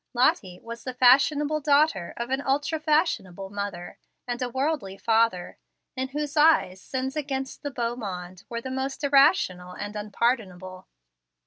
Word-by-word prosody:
Lottie 200 -7 +1
was 230 0 -8
the 255 -1 -5
fashionable 290 +4 +4
daughter 285 - +2
of 235 +2 -4
an 265 +1 0
ultra 290 +4 0
fashionable 300 - 0
mother 200 -4 -6 0.3
and 245 +1 -3
a 250 - -1
worldly 265 -7 -2
father, 225 -5 +1 0.4
in 260 0 -2
whose 295 +2 -4
eyes 295 - +4
sins 265 +1 -4
against 270 -3 -4
the 285 - -3
beau 240 -3 -2
monde 185 -4 -7
were 235 0 -4
the 260 - -6
most 265 +2 -3
irrational 275 - +3
and 205 +3 -6
unpardonable. 200 -4 -2
250 Hz, 145 wpm, -26 LUFS, 195-280 Hz, 0.4 s, fashionable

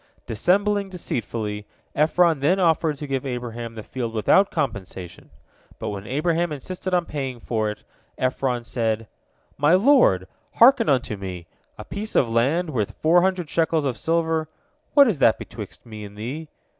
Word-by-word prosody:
Dissembling 200 - +1
deceitfully, 110 - -4 0.3
Ephron 160 +1 +3
then 170 +8 +2
offered 160 -3 +2
to 150 - -6
give 135 -2 -2
Abraham 120 -3 -5
the 110 - -7
field 120 -2 -5
without 190 - +4
compensation, 95 -7 -5 0.5
but - - -4
when 100 0 -6
Abraham 165 +4 0
insisted 180 +6 -5
upon 175 -1 +2
paying 135 -6 -4
for 110 -2 -1
it, 105 - -7 0.3
Ephron 130 -1 -1
said: 115 -2 -1 0.5
"My 150 +5 +5
lord, 195 - +4 0.3
hearken 240 -1 +6
unto 125 -5 +1
me. 90 -3 -7 0.3
A 110 - -8
piece 210 +2 -5
of 125 - +4
land 140 +10 +1
worth 110 -7 -2
four 170 +3 +4
hundred 185 -2 0
shekels 160 0 +1
of 130 -3 -1
silver, 160 0 0 0.5
what 285 -2 +8
is 195 -11 0
that 115 -4 +5
betwixt - - -9
me 110 -2 -9
and 100 0 -11
thee?" 135 +9 -5
140 Hz, 155 wpm, -23 LUFS, 115-175 Hz, 0.5 s, what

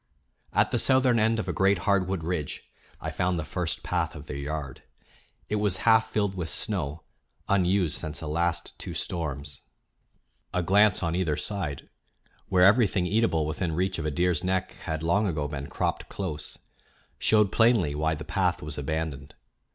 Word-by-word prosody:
At - - +2
the - - +1
southern 130 -3 +4
end 110 +1 +3
of 110 - -3
a - - -1
great 95 0 +3
hardwood 95 -3 +1
ridge 80 -3 -3 0.4
I - - -4
found 90 0 0
the 80 - -3
first 90 +1 -3
path 80 0 -1
of 75 -1 -9
their 75 - -6
yard. 70 -1 -5 0.7
It 105 - -1
was 105 -3 +1
half 110 -1 +5
filled 100 -3 0
with 90 -4 -4
snow, 70 +2 -2 0.4
unused 95 -3 +2
since 80 -2 -4
the 80 - -6
last 85 +3 -1
two - - -6
storms. 70 -5 -4 0.9
A 90 - +1
glance 100 +2 +4
on 85 0 0
either 85 -5 0
side, 85 -10 -2 0.6
where 90 -1 +4
everything 100 -3 +4
eatable 95 -6 +2
within 80 +2 -2
reach 95 +1 0
of 80 - -3
a - - +1
deer's 85 +1 +1
neck 95 0 0
had 80 -1 -3
long 100 +6 +2
ago 75 -5 -1
been 70 -1 -5
cropped - - -2
close, 85 -6 -5 0.6
showed 105 -2 +4
plainly 115 -11 +3
why 80 +2 0
the 75 - -8
path 90 -5 0
was 75 0 -4
abandoned. 75 -1 -4
90 Hz, 170 wpm, -27 LUFS, 75-100 Hz, 0.9 s, half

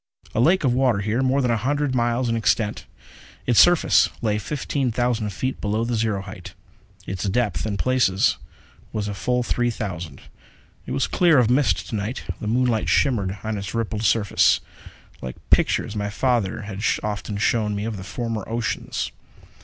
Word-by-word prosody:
A - - 0
lake 170 +8 +4
of 130 -3 +3
water 125 -5 +2
here, 110 +5 0
more 135 +1 +2
than 125 - +2
a 115 - +2
hundred 140 +4 0
miles 120 0 +1
in 115 - 0
extent. 110 -1 0 0.6
Its 120 -3 +4
surface 175 -1 +5
lay 105 -3 0
fifteen 140 0 -2
thousand 120 -2 0
feet 130 +7 -3
below 110 +3 0
the 120 - -2
zero 110 -3 0
height; 95 -2 -10 0.5
its 95 +1 -4
depth 105 -4 0
in 100 -2 -2
places 125 -7 +2 0.5
was 105 -1 -2
a 105 - -3
full 125 +5 0
three 120 0 0
thousand. 90 - -5 0.7
It - - -5
was - - +1
clear 170 -4 +3
of 120 -2 +4
mist 135 +2 +2
to - - -3
night. 105 +5 -3 0.2
The 105 - -5
moonlight 120 -1 +1
shimmered 100 -8 +1
on 110 -1 -2
its 100 +3 -6
rippled 110 -2 -2
surface, 110 -2 +3 0.6
like 65 0 -6 0.2
pictures 105 - +2
my 105 0 -2
father 110 -3 0
had 100 -1 -6 0.2
often 105 0 -3
shown 105 0 +1
me 100 +1 -3
of 110 -2 -3
the 95 - -7
former 115 +1 -4
oceans. 115 -6 -2
115 Hz, 175 wpm, -23 LUFS, 105-125 Hz, 0.7 s, surface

